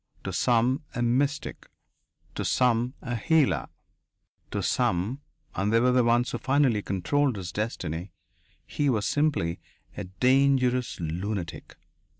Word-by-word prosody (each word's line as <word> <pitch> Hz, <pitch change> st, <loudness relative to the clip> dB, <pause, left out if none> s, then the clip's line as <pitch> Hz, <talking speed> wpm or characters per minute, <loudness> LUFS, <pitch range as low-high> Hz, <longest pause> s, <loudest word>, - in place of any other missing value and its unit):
To -, -, -4 dB
some, 125 Hz, +4 st, +2 dB
a 120 Hz, -, 0 dB
mystic. 140 Hz, +5 st, -1 dB, 0.7 s
To -, -, -3 dB
some, 125 Hz, 0 st, +1 dB
a 120 Hz, -3 st, -3 dB
healer. 115 Hz, -, +2 dB, 0.8 s
To -, -, -3 dB
some 105 Hz, +11 st, 0 dB, 0.3 s
and 100 Hz, +3 st, -1 dB
they 115 Hz, -, +4 dB
were 125 Hz, +2 st, +3 dB
the 125 Hz, 0 st, +4 dB
ones 120 Hz, +1 st, +2 dB
who 120 Hz, -, -3 dB
finally 135 Hz, -6 st, +2 dB
controlled 125 Hz, +9 st, 0 dB
his 90 Hz, -4 st, -6 dB
destiny 90 Hz, -5 st, -4 dB, 0.5 s
he 145 Hz, -2 st, -1 dB
was 110 Hz, -5 st, 0 dB
simply 145 Hz, -, 0 dB, 0.4 s
a 100 Hz, -, -5 dB
dangerous 125 Hz, +4 st, +2 dB
lunatic. 85 Hz, +2 st, -4 dB
120 Hz, 130 wpm, -27 LUFS, 100-130 Hz, 0.8 s, they